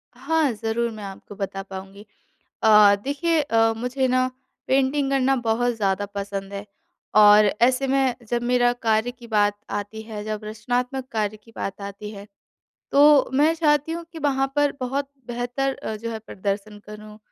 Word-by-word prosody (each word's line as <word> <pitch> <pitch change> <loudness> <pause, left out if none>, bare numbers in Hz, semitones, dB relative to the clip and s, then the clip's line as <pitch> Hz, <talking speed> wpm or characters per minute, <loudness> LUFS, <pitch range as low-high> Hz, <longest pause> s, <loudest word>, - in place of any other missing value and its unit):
हाँ, 295 +2 +1
ज़रूर 225 +2 -1
मैं 215 -2 -9
आपको 195 +1 -9
बता 195 -1 -4
पाऊँगी। 195 +1 -10 0.6
अ, 210 -2 +7
देखिए, 320 +3 +1
अ, 225 -4 +2
मुझे 250 +3 -1
ना 255 0 +2 0.4
पेंटिंग 270 +1 +1
करना 270 0 +2
बहुत 240 0 0
ज़्यादा 200 -1 0
पसंद 200 -1 -5
है 200 0 -5 0.5
और 210 0 +8 0.2
ऐसे 260 +2 +3
में 265 -1 +2
जब 240 0 -1
मेरा 245 0 +3
कार्य 225 -1 0
की 245 -1 -14
बात 205 -2 +2 0.2
आती 205 +2 -4
है, 215 -1 -7
जब 215 0 -4
रचनात्मक 245 +4 -3
कार्य 215 -1 -1
की 215 +2 -21
बात 195 +1 -5
आती 200 +1 -7
है। 200 -1 -10 0.7
तो 290 -1 +6
मैं 300 +4 +4
चाहती 300 -1 +1
हूँ 335 0 -5
कि 325 - -8
वहाँ 270 -2 +1
पर 290 -1 +3
बहुत 275 +2 -2 0.2
बेहतर 245 +3 -2 0.3
जो 230 - -3
है 225 - -4
प्रदर्शन 205 0 -5
करूँ, 210 0 -11
230 Hz, 165 wpm, -23 LUFS, 210-265 Hz, 0.7 s, और